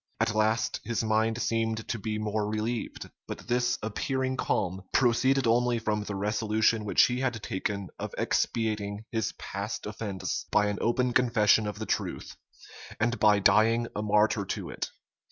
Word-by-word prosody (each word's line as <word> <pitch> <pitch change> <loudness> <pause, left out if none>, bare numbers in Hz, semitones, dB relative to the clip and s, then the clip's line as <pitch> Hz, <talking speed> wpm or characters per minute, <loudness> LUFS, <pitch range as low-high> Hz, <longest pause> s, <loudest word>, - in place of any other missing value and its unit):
At - - +1
last, 110 +1 +1
his 120 -1 -1
mind 110 +1 +1
seemed 115 -1 -1
to 115 - -2
be 105 +1 -3
more 105 0 -1
relieved; 110 +2 -3 0.2
but - - -7
this 125 0 +1
appearing 130 +4 -1
calm 95 -6 -1
proceeded 130 +2 +3
only 120 +1 +3
from 105 -2 -1
the 105 - -4
resolution 110 +2 +1
which 105 - +5
he 125 0 -1
had 120 -5 -2
taken 100 0 -3
of - - -5
expiating 105 -2 -1
his 110 -2 -1
past 100 +4 -5
offence 100 -4 -4
by 105 -1 +3
an 100 - -3
open 125 +1 +1
confession 110 -4 +4
of 105 - -4
the - - -4
truth, - - -3 0.6
and 120 0 0
by 105 -1 +5
dying 115 +4 +4
a 105 - -1
martyr 105 0 +2
to 95 - -4
it. - - -4
110 Hz, 160 wpm, -28 LUFS, 105-120 Hz, 0.6 s, which